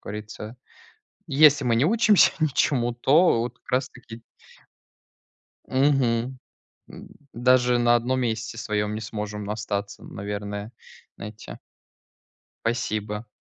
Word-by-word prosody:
как - - -69
говорится. 105 +2 -8 0.7
Если 145 -1 +5
мы 115 -2 +2
не 125 - +3
учимся 215 -1 +4
ничему, 130 -5 +1
то 135 +2 +3
вот 120 - -5
как - - -15
раз 130 +1 +1
таки 115 -2 -13 1.4
Мгм. 130 -2 +1 0.5
М, - - -11 0.3
даже 125 0 +3
на 120 0 +4
одном 130 +2 0
месте 115 -1 -3
своём 105 -1 -2
не 110 - -5
сможем 105 -1 -5
остаться, 105 -1 -4
наверное, 100 +2 -6 0.5
знаете. 105 +1 -9 1.1
Спасибо. 110 -2 -2
115 Hz, 110 wpm, -24 LUFS, 105-130 Hz, 1.4 s, Если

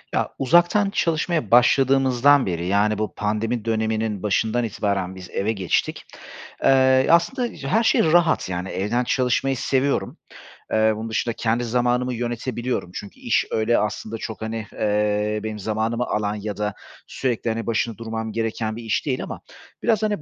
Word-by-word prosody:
Ya, - - 0
uzaktan 175 +8 +4
çalışmaya 165 - 0
başladığımızdan 135 +2 +4
beri, 85 -2 -2
yani, 105 +2 +2
bu 110 0 -3
pandemi 110 +2 -2
döneminin 110 -2 -1
başından 110 +3 +1
itibaren 100 -4 -2
biz 90 -2 -10
eve 100 +3 -1
geçtik. 95 -5 -1 0.6
Eee, 130 -1 +5
aslında 235 +9 +2
her 225 +11 +2
şey - - +4
rahat, 165 - +3
yani, 90 +1 -3
evden 105 +6 -1
çalışmayı 130 +2 +1
seviyorum. 135 +3 0 0.5
Eee, 110 0 +3
bunun 110 +1 -5
dışında 115 +1 -1
kendi 115 +1 0
zamanımı 125 +1 0
yönetebiliyorum 120 -3 -3
çünkü 100 - -8
iş - - +1
öyle 110 +2 +2
aslında 105 +1 -3
çok, 110 0 -7
hani, 110 -1 -4
eee, 105 0 0
benim 110 -1 -4
zamanımı 110 +3 -1
alan 105 -2 -1
ya 105 0 -5
da 105 -1 -2 0.3
sürekli, 120 -3 -2
hani, 115 0 -3
başında 115 -1 -1
durmam 110 0 -4
gereken 110 0 -2
bir 115 - -8
iş 110 -2 -1
değil 130 -3 -1
ama - - -7 0.4
biraz, 220 -2 +2
hani, 210 -5 0
115 Hz, 155 wpm, -23 LUFS, 105-130 Hz, 0.6 s, Eee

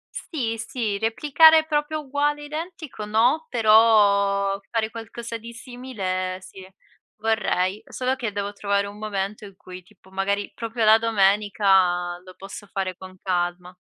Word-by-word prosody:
Sì, 230 -8 -3
sì, 220 -4 -3
replicare 305 +7 +5
proprio 305 0 -1
uguale 290 +1 -1
identico, 315 -4 -7
no, 245 +10 +2
però 205 -3 +4
fare 225 -1 -1
qualcosa 230 +1 -7
di 230 +1 -10
simile, 215 -7 -4
sì, 190 0 -13 0.5
vorrei. 210 -3 0
Solo 255 +1 -2
che 240 -5 -4
devo 200 0 -4
trovare 200 0 0
un 205 +1 -9
momento 205 -1 -4
in 195 -2 -13
cui, 185 -1 -11
tipo 190 0 -23
magari, 200 +1 -2
proprio 230 -1 -2
la 220 +1 +7
domenica, 195 -4 +2
lo 185 0 -14
posso 195 +1 -10
fare 190 -2 -3
con 185 +1 -12
calma. 180 0 -2
210 Hz, 140 wpm, -23 LUFS, 195-235 Hz, 0.5 s, la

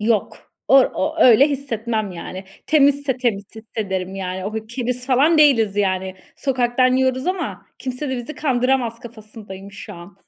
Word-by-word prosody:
Yok. 215 -1 -1 0.2
Or 270 -1 +6
o 310 +2 -2
öyle 255 +4 +7
hissetmem, 230 -7 -3
yani. 185 +2 -8 0.2
Temizse 285 -3 +3
temiz 230 -6 -1
hissederim, 195 -4 -4
yani. 185 -1 -4
O 205 - -4
keriz 240 +3 -4
falan 285 +5 +3
değiliz, 230 -9 +4
yani. 190 -2 -1 0.2
Sokaktan 255 -1 +1
yiyoruz 260 +1 0
ama 370 -2 -3
kimse 260 +3 -4
de 260 - -2
bizi 245 +5 -6
kandıramaz 250 -4 0
kafasındayım 210 -4 -11
şu 205 +1 -9
an. 175 +2 -13
235 Hz, 145 wpm, -20 LUFS, 205-265 Hz, 0.2 s, öyle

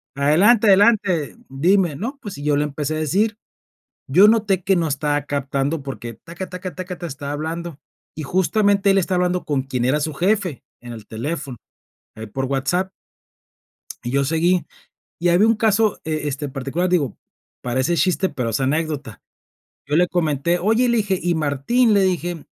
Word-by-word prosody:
adelante, 190 - +4
adelante, 195 - +3
dime", 170 +4 +2
¿no? 235 - -5
Pues, 205 - -7
y - - -7
yo 150 0 +2
le 145 - +2
empecé 150 +1 -3
a - - -2
decir. 205 +8 0 0.7
Yo 180 +10 +7
noté 210 -4 +2
que 195 - +3
no 165 -2 0
estaba 145 +1 0
captando 140 +2 -2
porque, 130 -4 -7
taca, 170 - -8
taca, 180 0 -6
taca, 185 0 -6
ta, 175 - -5
estaba 140 -2 -6
hablando, 160 +1 -5 0.4
y 155 - -6
justamente 200 +4 +2
él 195 - +4
está 185 0 0
hablando 180 0 0
con 145 -3 0
quien 130 -3 -2
era 145 +4 +2
su 155 +1 -2
jefe 185 - 0 0.2
en 120 0 -9
el 110 -2 -11
teléfono, 135 +2 -5 0.6
ahí 110 - -7
por 135 +6 -3
WhatsApp. 175 +8 -1 1.1
Y 120 - -4
yo 140 +1 +2
seguí, 170 +4 +2 0.6
y 175 - +2
había 180 +5 +4
un 225 - +4
caso, 215 -1 +2
e 155 -2 -2
este, 145 +1 -4
particular, 140 +7 -2
digo: 145 - 0 0.5
"Parece 130 +7 0
chiste, 185 +4 +1
pero 120 -4 -3
es 110 - 0
anécdota". 140 -4 -2 0.7
Yo 145 - 0
le 180 +1 +4
comenté: 170 0 0
"Oye", 225 +6 +2
le 235 - +2
dije: 200 -3 0
"¿y 175 -1 0
Martín?", 160 - +2
le 200 - +4
dije: 175 -3 -2
165 Hz, 175 wpm, -21 LUFS, 140-190 Hz, 1.1 s, Yo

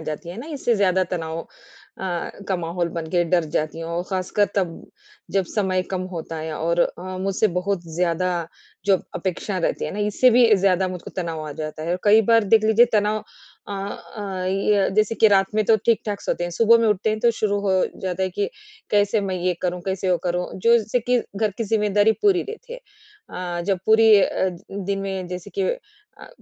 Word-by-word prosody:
जाती 170 +3 -6
है 175 - -7
ना 290 - -9
इससे 240 -3 +1
ज़्यादा 190 -2 +2
तनाव 160 -1 -4
अ, 175 +1 -7 0.2
का 190 - +1
माहौल 170 0 -2
बन 165 -1 -5
के 175 -1 +2
डर 170 -2 +4
जाती 155 +2 -2
हूँ। 165 0 -5
और 175 +1 -1
ख़ासकर 190 +2 +1
तब, 185 -4 +1 0.6
जब 195 -1 +1
समय 190 -3 +1
कम 185 - -1
होता 165 0 -5
है 160 0 -4
और 170 +1 +1
अ, 175 - 0 0.2
मुझसे 195 +2 +2
बहुत 195 -2 -2
ज़्यादा 180 +1 +1 0.6
जो 195 -2 +4 0.2
अपेक्षा 185 +2 -3
रहती 170 - -1
है - - -3
ना, - - -5
इससे 210 +5 +3
भी 235 -3 +6
ज़्यादा 190 -1 +2
मुझको 180 -1 -7
तनाव 160 -3 -4
आ - - -5
जाता 155 0 -5
है। 165 - -3
और 180 - -1
कई 215 +2 +6
बार 225 -2 +5
देख 220 -1 +6
लीजिए 220 +2 +5
तनाव 210 +1 +1 0.5
अ 205 - -5
अ, 195 -1 -5
ये 195 +1 +2
जैसे 215 +1 +2
कि 220 -1 +5
रात 195 +1 +2
में 215 - +2
तो 220 +1 +5
ठीक-ठाक 215 -3 +1
सोते 175 - -2
हैं। 175 - -4
सुबह 230 +5 +5
में - - +3
उठते 210 +1 +1
हैं 215 - -1
तो 235 - +4
शुरू 205 -1 +1
हो 190 - +3 0.3
जाता 190 0 -2
है 185 - +1
कि 200 - +1 0.4
कैसे 205 +1 +3
मैं 185 - -1
ये 180 0 0
करूँ? 180 0 -1
कैसे 190 -1 -1
वो 180 - +4
करूँ? 180 0 -1
जो 230 +5 +4
जैसे 225 +3 -1
कि 245 +2 +1 0.2
घर 215 0 +1
की 230 - -1
जिम्मेदारी 210 0 +3
पूरी 390 -4 +4
रहती 465 +3 -9
है। - - -6 0.5
अ, 175 -1 -4
जब 195 -2 +2
पूरी 220 0 +6
अ, 190 - +1 0.2
दिन 195 0 -3
में 190 -2 -4
जैसे 180 -1 -7
कि 390 - +2 0.6
अ, - - -11
195 Hz, 210 wpm, -22 LUFS, 180-215 Hz, 0.6 s, भी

